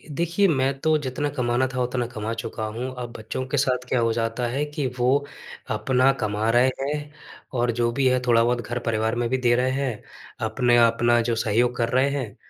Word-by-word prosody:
देखिए, 170 +5 +2
मैं 135 -4 +1
तो 155 +2 +2
जितना 145 +1 -3
कमाना 125 -2 0
था 125 - -1
उतना 125 0 -1
कमा 115 -2 -4
चुका 110 -1 -5
हूँ, 120 +4 -5
अब 120 -1 -5
बच्चों 110 +4 -5
के 145 - -1
साथ 125 -2 0
क्या 125 - +2
हो 115 -1 +2
जाता 115 +1 -1
है 135 +5 -1
कि 150 -1 -4
वो 135 +4 +2 0.5
अपना 130 0 +3
कमा 105 +1 0
रहे 120 +2 +4
हैं 145 +1 -3 0.5
और 120 0 +2
जो 120 - +2
भी 135 +2 +1
है 130 0 +3
थोड़ा-बहुत 120 +1 +3
घर, 120 +1 -4
परिवार 110 -1 -1
में 120 0 0
भी 130 - +1
दे 120 -1 +3
रहे 125 +1 +1
हैं। 130 -5 -3 0.4
अपने 120 +2 +2
अपना 120 +1 +3
जो 115 0 0
सहयोग 115 +3 +1
कर 115 -1 0
रहे 130 +3 +2
हैं, 130 -7 -4
125 Hz, 205 wpm, -24 LUFS, 115-135 Hz, 0.5 s, रहे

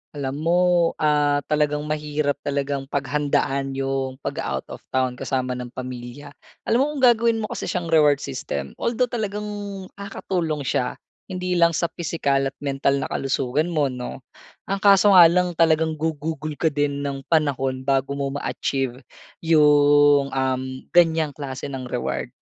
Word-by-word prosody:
Alam 140 -1 -3
mo, 170 +3 +2 0.5
ah, 145 -1 +2
talagang 150 -1 +1
mahirap 150 -1 -2
talagang 140 -1 -2
paghandaan 140 -1 -1
'yong 135 -1 -2
paga-out 65 0 -3
of - - -7
town 130 -1 -1
kasama 130 -1 -2
ng 125 -1 -4
pamilya. 130 +3 -7 0.3
Alam 230 - +2
mo, 275 - +4
kung 270 - -4
gagawin 235 -2 +4
mo - - -5
kasi - - -4
siyang 170 -2 -3
reward 150 -3 +4
system, 70 - -5
although 240 +1 0
talagang 210 -3 -3 0.6
nakakatulong 170 -6 -3
siya 125 -1 -1 0.3
hindi 180 -2 -2
lang 170 -1 +4
sa 170 - -1
pisikal 140 -5 0
at 135 - -7
mental 140 0 0
na - - -6
kalusugan 135 +3 0
mo 150 -6 0
'no, 125 +1 -7 0.4
ang 195 0 -3
kaso 200 0 +6
nga 180 -3 +9
lang 180 +1 +1
talagang 160 -1 +3
gugugol 155 -1 -3
ka 160 0 +1
din 145 0 -1
ng 140 -1 -3
panahon 135 -5 0
bago 135 0 0
mo 140 -1 -2
ma-achieve 135 -2 -3 0.4
'yong, 145 -2 +5
uhm, 130 0 -2
ganyang 160 -4 +3
klase 135 -2 -6
ng 135 -2 -6
reward. 125 - -3
145 Hz, 150 wpm, -23 LUFS, 135-160 Hz, 0.6 s, nga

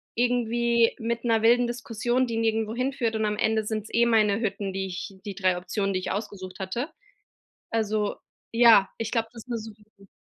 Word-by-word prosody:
irgendwie 235 -1 +2
mit 235 +1 -2
'ner 225 -2 +3
wilden 240 +2 +4
Diskussion, 240 +1 -1
die 230 -1 -3
nirgendwo 225 -1 0
hinführt, 255 -2 -1
und 220 0 0
am 210 0 -1
Ende 220 0 +1
sind's 215 0 -3
eh 235 +1 +4
meine 215 -2 +3
Hütten, 200 -3 -2
die 190 0 -2
ich 190 +2 -7
die 200 -2 -5
3 185 -2 +1
Optionen, 195 +2 -2
die 185 - 0
ich 185 - -4
ausgesucht 195 -3 -5
hatte. 215 - -3 0.8
Also, 215 -2 0 0.4
ja, 230 -4 +6
ich 225 -1 -3
glaub, 225 -2 0
das 230 -2 -11
ist - - -26
'ne 235 - -1
super 215 -1 -11 0.2
Idee. 195 0 -18
225 Hz, 195 wpm, -26 LUFS, 205-235 Hz, 0.8 s, ja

